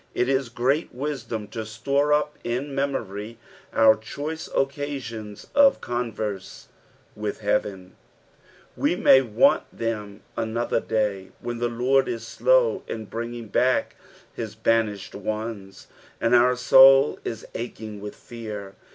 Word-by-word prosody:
It 125 - +1
is 135 -2 +1
great 130 +7 0
wisdom 125 -6 -4
to 110 +1 -5
store 140 +7 0
up 150 0 +2
in 130 +4 -3
memory 115 -6 -3 0.3
uur 110 -1 +5
choice 155 +8 -5
occasions' 135 -7 -3
of 280 -1 +5
converse 110 -5 -4 0.5
with 105 0 -4
heaven; 100 -3 -1 0.8
we - - +1
may 135 - +6
want 115 -5 +3
them 105 -3 -4
another 115 +1 -1
day, 105 -4 -2
when 120 0 -5
the 120 0 0
Lord 125 +3 +2
is 115 - -4
slow - - +2
in 110 -1 -5
brining 115 0 -6
back 130 0 +2 0.4
his 110 -2 -6
banished 110 -3 0
ones, 105 -1 -5 0.3
and 115 +1 +1
our 125 +1 +5
soul 135 +2 +7
ia 115 - -3 0.2
aching 110 -3 -6
with 105 0 -7
fear. 105 -4 -8
115 Hz, 125 wpm, -24 LUFS, 105-135 Hz, 0.8 s, soul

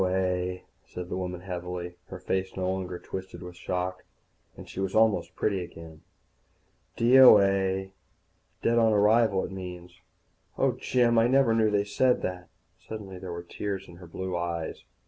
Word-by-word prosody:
"D.O.A.," 90 -1 0 0.2
said 90 0 -8
the - - -3
woman 90 -1 -4
heavily. 90 -1 -5
Her 95 - -8
face 95 +1 -2
was - - -14
no 95 0 0
longer 95 -1 -4
twisted 95 +1 -8
with 90 0 -9
shock, 90 +1 -3 0.5
and - - -10
she - - -8
was 95 -1 -2
almost 110 -2 +2
pretty 95 -4 0
again. 80 -2 -12 0.9
"D.O.A. 100 -6 +5 0.7
Dead 115 0 +3
on 110 -1 +4
arrival, 105 -1 +3
it - - -8
means. 90 -1 -9 0.6
Oh, - - +3
Jim, 120 -2 +2
I 115 - +4
never 130 -2 +4
knew 110 -1 +3
they 105 -1 +2
said 125 +5 +2
that." 90 -1 -4 0.3
Suddenly 100 -4 -8
there 90 -1 -7
were 85 0 -6
tears 95 +2 -5
in 85 - -13
her 90 -1 -12
blue 95 +2 -4
eyes. 85 -2 -4
95 Hz, 165 wpm, -27 LUFS, 90-105 Hz, 0.9 s, D.O.A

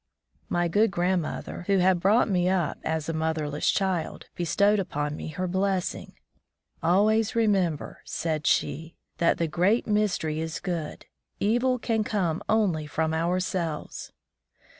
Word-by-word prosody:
My 175 0 +1
good 210 +7 +3
grandmother, 175 -2 -2
who 200 -1 +3
had 185 -1 +3
brought 205 +7 +4
me 180 -3 +1
up 180 -5 0
as 160 -2 -2
a 165 - -2
motherless 155 -2 -1
child, 190 -4 -1
be 175 - -4
stowed 200 +5 +3
upon 150 -5 -2
me - - -6
her 170 +4 -3
blessing. 190 0 -1 0.7
"Always 210 +6 +3
remember," 195 -9 0
said 155 -2 -2
she, 165 +3 0 0.2
"that 170 - +3
the 165 - 0
Great 185 +9 +2
Mystery 200 -7 0
is 160 +1 -3
good; 170 -5 -4 0.3
evil 245 +5 +2
can 225 -2 0
come 180 -7 -1
only 185 -9 +1
from 160 +2 -1
ourselves!" 170 -1 -2
180 Hz, 140 wpm, -26 LUFS, 160-200 Hz, 0.7 s, brought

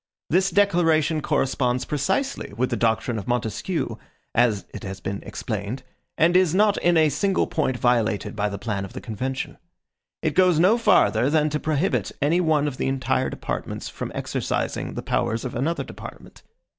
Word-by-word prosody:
This 185 +3 +3
declaration 165 -6 +3
corresponds 125 -2 0
precisely 265 - -1
with 130 +2 0
the - - +1
doctrine 115 0 0
of 100 - -9
Montesquieu, 120 -3 -2 0.4
as 115 -4 +2
it - - -7
has 95 -1 -6
been 100 +3 -4
explained, 110 +3 -5 0.3
and 170 +3 +4
is 185 -2 +4
not 205 +1 +4
in 175 -1 +3
a 155 -1 +5
single 190 +7 +1
point 130 -5 -1
violated 115 -5 +1
by 105 -1 0
the 100 - -5
plan 100 -1 -3
of 95 - -8
the - - -5
convention. 130 +4 -4 0.6
It 155 - +1
goes 180 0 +4
no 190 +8 +4
farther 140 - +4
than 155 0 +2
to 150 - -1
prohibit 155 +5 0
any 160 +5 +2
one 155 -3 +2
of 135 -3 -4
the - - -1
entire 130 -1 0
departments - - -5
from - - -6
exercising - - -2
the - - -4
powers 115 +2 -1
of 125 - -4
another 155 +8 -1
department. - - -11
140 Hz, 170 wpm, -24 LUFS, 115-170 Hz, 0.6 s, a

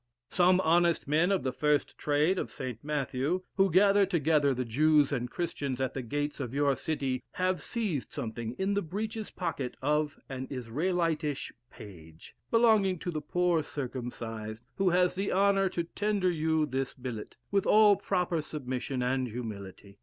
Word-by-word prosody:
Some 180 0 +4
honest 170 -1 +3
men 160 +6 +3
of 195 - +1
the 130 - 0
first 150 +2 +1
trade 150 +6 +1
of - - -3
St. 130 -5 -6
Matthew, 150 +3 -1
who 195 0 +4
gather 200 +3 +5
together 155 -6 +2
the 130 -1 -1
Jews 150 +5 +3
and 125 -3 -2
Christians 140 -6 -3
at 130 0 -1
the 135 - -3
gates 145 +5 -3
of 130 -2 -4
your 140 -1 +3
city, 135 -5 -2
have 185 0 0
seized 205 - -3
something 115 -3 -4
in 190 +8 -1
the 200 - +1
breeches 215 +5 -4
pocket 160 -8 -4
of 150 +2 0
an 130 -1 -5
Israelitish 150 +4 -1 0.2
page, 80 -5 -13 0.2
belonging 220 -5 +4
to 175 - -4
the 155 -2 -3
poor 175 +2 +1
circumcised, 120 -6 -5
who 195 -1 +3
has 180 0 +3
the 195 +2 -2
honour 195 0 +3
to 175 -1 -2
tender 200 +1 0
you 160 -1 +1
this 135 -2 -3
billet, 125 -4 -7
with 200 -1 +1
all 210 -1 +7
proper 180 -4 -1
submission 130 -3 -4
and 130 +1 0
humility. 100 -4 -8
150 Hz, 160 wpm, -30 LUFS, 130-180 Hz, 0.2 s, all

